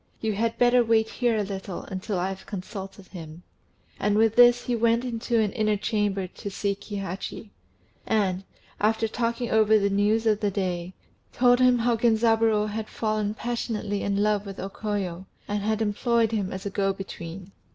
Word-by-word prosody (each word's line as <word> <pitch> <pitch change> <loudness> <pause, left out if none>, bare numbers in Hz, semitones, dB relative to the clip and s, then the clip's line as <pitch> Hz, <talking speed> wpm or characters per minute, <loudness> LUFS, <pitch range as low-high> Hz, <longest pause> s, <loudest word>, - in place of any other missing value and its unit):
You 220 -1 -1
had 225 +3 -1
better 245 0 +5
wait 225 -1 +3
here 240 -2 0
a 210 - +1
little 195 -2 -5
until 190 +1 -4
I 180 +2 0
have 195 0 -8
consulted 195 -1 -7
him;" 165 -2 -10 0.6
and 210 0 +1
with 225 0 +3
this 245 0 +6
he 245 - -1
went 230 +1 +2
into 235 -1 -1
an 210 -2 +1
inner 215 0 +1
chamber 205 -2 -1
to 190 +2 -8
see 200 0 -1
Kihachi; 200 +1 -6 0.6
and, 195 -4 +1 0.4
after 220 +1 +2
talking 235 +1 -2
over 220 0 +5
the 200 -1 +1
news 210 +3 +2
of 215 -2 +3
the 205 - +1
day, 185 -2 -3 0.4
told 245 0 +4
him 250 -1 +5
how 235 0 +2
Genzaburô 225 -2 +3
had 215 +1 -4
fallen 215 -1 -1
passionately 220 -3 -3
in 200 0 0
love 210 -1 +1
with 195 -2 -8
O 195 - -4
Koyo, 195 -4 -4 0.2
and 205 0 -1
had 220 +1 0
employed 225 +2 +1
him 205 -4 -1
as 190 +1 -6
a 200 - -3
go 195 0 +1
between. 185 -1 -8
210 Hz, 180 wpm, -26 LUFS, 195-225 Hz, 0.6 s, this